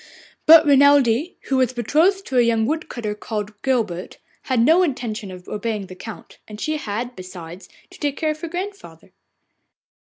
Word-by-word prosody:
But 320 0 +9
Renelde, 285 +1 +4
who 265 - -1
was 255 -1 +2
betrothed 325 - +2
to 255 - +1
a - - +7
young 230 -2 +2
wood 315 +5 -2
cutter 215 -4 -4
called 210 -1 -6
Guilbert, 220 -10 -2 0.3
had 255 -3 0
no 320 +10 +5
intention 235 - -2
of 180 -1 -11
obeying 210 -1 -3
the 185 - -11
Count, 220 +3 -10
and 210 -1 -10
she 310 +4 -1
had, 240 0 -4
besides, 185 -1 -10 0.2
to - - -15
take 290 -2 -2
care 310 -1 0
of 305 0 -7
her 335 - -4
grandmother. 390 +4 -7
245 Hz, 175 wpm, -21 LUFS, 210-305 Hz, 0.3 s, But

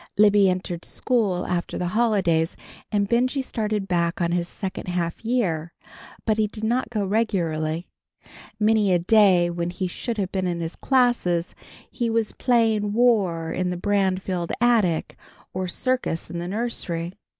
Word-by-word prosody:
Libby 205 -2 +6
entered 180 -2 -3
school 205 -8 0
after 175 -1 -2
the 180 - -1
holidays, 190 -7 +1 0.3
and 205 -2 +1
Benjy 255 +5 +1
started 215 -5 -2
back 170 -1 0
on 170 -1 0
his 175 0 0
second 190 +1 -6
half 175 0 -2
year, 180 -9 -1 0.5
but 220 -1 +1
he 215 - +3
did 215 +1 -9
not 240 +4 0
go 210 -4 -1
regularly. 170 -6 -1 0.7
Many 215 -2 +3
a - - +5
day 180 -2 +4
when 170 0 -2
he 180 +1 -3
should 225 +6 -4
have 190 -3 -2
been 190 -1 -1
in 175 -1 -2
his 165 0 -4
classes, 240 -10 +1 0.4
he 240 -1 -1
was 225 -1 0
playing 220 -4 +1
War 200 -9 +2
in 180 +1 -1
the 180 - -3
Branfield 190 -2 0
attic, 220 -9 +2 0.4
or 185 0 -2
Circus 245 -6 -2
in 170 - -4
the 175 - -4
nursery. 180 -5 -3
190 Hz, 155 wpm, -24 LUFS, 175-220 Hz, 0.7 s, Libby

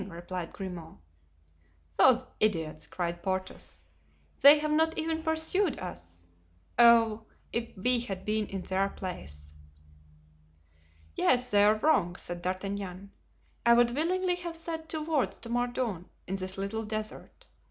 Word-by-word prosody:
replied 175 0 -6
Grimaud. 180 -4 -8 1.0
"Those 255 -1 +5 0.2
idiots!" 160 -7 0
cried 175 -1 -4
Porthos, 185 0 -4 0.6
"they 285 +2 +9
have 300 0 -2
not 320 +1 +2
even 320 0 -1
pursued 320 +1 0
us. 85 - -9 0.5
Oh! 225 -2 +5 0.3
if 230 -2 -4
we 245 +6 +3
had 195 -6 -5
been 215 0 0
in 195 -2 -5
their 195 +1 0
place!" 75 - -8 1.6
"Yes, 250 - +2
they 205 -1 +5
are 210 +1 +5
wrong," 215 - +2
said 175 0 -6
D'Artagnan. 195 +1 -4 0.5
"I 235 - +6
would 240 0 +4
willingly 360 +5 0
have 345 -2 -6
said 325 -1 -5
two 315 -1 -3
words 305 -4 0
to 230 - -10
Mordaunt 240 -6 -2 0.2
in 195 - -3
this 185 0 -5
little 200 +3 -3
desert. 215 0 -3
215 Hz, 130 wpm, -29 LUFS, 185-270 Hz, 1.6 s, they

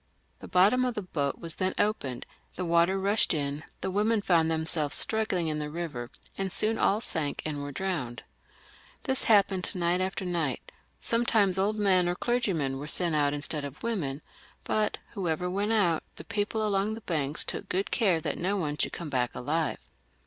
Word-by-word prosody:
The - - -9
bottom 200 +8 +4
of 250 -2 -1
the 210 - -3
boat 145 -6 -2 0.2
then 185 0 0
opened, 135 - -1 0.3
the 185 - -3
water 170 +3 +3
rushed 200 -2 +2
in, 145 +1 -2 0.2
the 190 - -2
women 210 +2 +1
found 165 -4 +3
themselves 160 -2 0
struggling 215 -6 +1
in 155 -1 -1
the 150 0 -3
river, 150 -7 -5 0.3
and 195 -1 -1
soon 220 +4 +1
all 205 +3 +3
sank 155 -9 -1
and 150 -2 -2
were 145 0 -5
drowned. 150 -9 -3 0.8
This 265 -1 +4
happened 200 -4 +4
one - - -3
night 175 +2 +2
after 190 +1 -2
another; 165 -7 0 0.4
sometimes 220 -5 +2
old 210 +3 +1
men 185 -4 +3
or 175 - 0
clergymen 180 - 0
were 145 - -6
sent 170 +2 +3
out 145 -1 +3
instead 145 0 -2
of 140 0 -8
women; 160 -12 -2 0.4
but 215 -1 0 0.2
whoever 180 -2 -1
went 200 +4 0
out, 180 -8 +3
the - - -9
people 215 +1 -1
along 205 +1 +1
the 225 - -9
banks 150 -6 -1
took - - -5
good 190 +2 -1
care 190 -8 +3
that - - -3
no 195 +4 0
one 150 -5 -1
should - - 0
come 165 -4 -6
back 125 -2 0
alive. 150 +2 -1
180 Hz, 185 wpm, -28 LUFS, 150-205 Hz, 0.8 s, bottom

